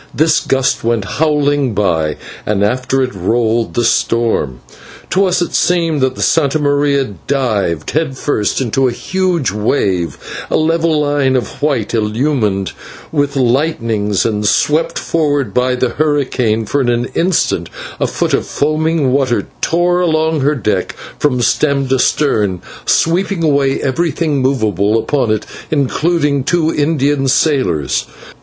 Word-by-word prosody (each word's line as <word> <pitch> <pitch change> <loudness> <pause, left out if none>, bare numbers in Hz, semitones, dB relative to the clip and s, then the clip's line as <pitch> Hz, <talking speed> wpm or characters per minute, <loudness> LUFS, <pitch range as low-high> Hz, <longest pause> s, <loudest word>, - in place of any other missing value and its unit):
This 155 +1 +3
gust 135 -1 0
went 115 -3 0
howling 145 +1 0
by, 80 -6 0 0.3
and 100 -1 0
after 130 +5 0
it 125 - -3
rolled 115 +4 0
the 120 - +1
storm. 115 - 0 0.5
To 195 +1 +3
us 180 -1 +1
it - - -6
seemed 165 -4 +1
that 130 0 +1
the - - -2
/Santa 155 -2 +2
Maria/ 145 -1 +2 0.2
dived 105 - -1
head 150 -4 -1
first 105 -9 -1
into 130 +2 +1
a - - 0
huge 180 - -1
wave, 100 -5 -1 0.3
a - - +2
level 160 0 +1
line 145 -3 +1
of 125 - -3
white 135 -8 0
illumined 110 - 0 0.4
with 145 -2 0
lightnings 115 - 0
and 105 -2 -1
swept 160 +10 +1
forward 145 -4 -1
by 125 0 +1
the 125 0 0
hurricane, 130 -6 0
for 140 +7 0
in 125 - 0
an 120 0 0
instant 175 0 0 0.3
a - - +1
foot - - -2
of - - 0
foaming 155 -1 0
water 130 -3 +1 0.2
tore 175 +1 +1
along 160 -3 +1
her 145 +3 +2
deck 105 -7 -2 0.2
from 130 -4 +1
stem 140 +1 +1
to 130 0 +2
stem, 105 -11 +1 0.3
sweeping 175 +1 +1
away 140 -3 +2
everything 150 0 -1
movable 110 -5 +1
upon 125 +1 0
it, 110 -1 0 0.2
including 145 0 +1
two 165 +1 +1
Indian 145 -2 +1
sailors. 85 - +1
135 Hz, 140 wpm, -15 LUFS, 115-155 Hz, 0.5 s, This